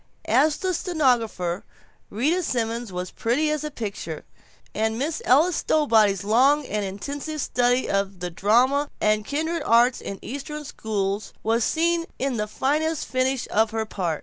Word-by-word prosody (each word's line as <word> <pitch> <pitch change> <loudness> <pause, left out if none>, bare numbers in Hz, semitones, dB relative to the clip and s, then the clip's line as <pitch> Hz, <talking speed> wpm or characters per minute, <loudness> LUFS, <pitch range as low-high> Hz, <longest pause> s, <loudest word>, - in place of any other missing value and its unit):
As 305 0 +4
the 375 -1 -1
stenographer 245 - 0 0.5
Rita 295 - +1
Simons 235 - -2
was 180 0 -5
pretty 285 +7 0
as 305 -1 -2
a 300 - -3
picture, 200 - -6 0.5
and 220 +1 0
Miss 300 +5 -2
Ella 305 +8 +5
Stowbody's 220 - +2
long 265 +8 +3
and 210 -3 -2
intensive 280 +11 -5
study 245 -1 +1
of 195 -1 -1
the 180 0 -4
drama 255 - +2
and 215 0 +2
kindred 320 +7 -2
arts 240 -2 +3
in 195 - -6
Eastern 295 +4 -6
schools 205 -6 -3
was 225 +1 +2
seen 335 +3 +1
in 265 -2 -1
the 210 0 -1
fine 305 +8 0
finish 260 -3 -1
of 220 +1 +3
her 220 0 -2
part. 175 -7 -2
245 Hz, 150 wpm, -24 LUFS, 210-295 Hz, 0.5 s, Ella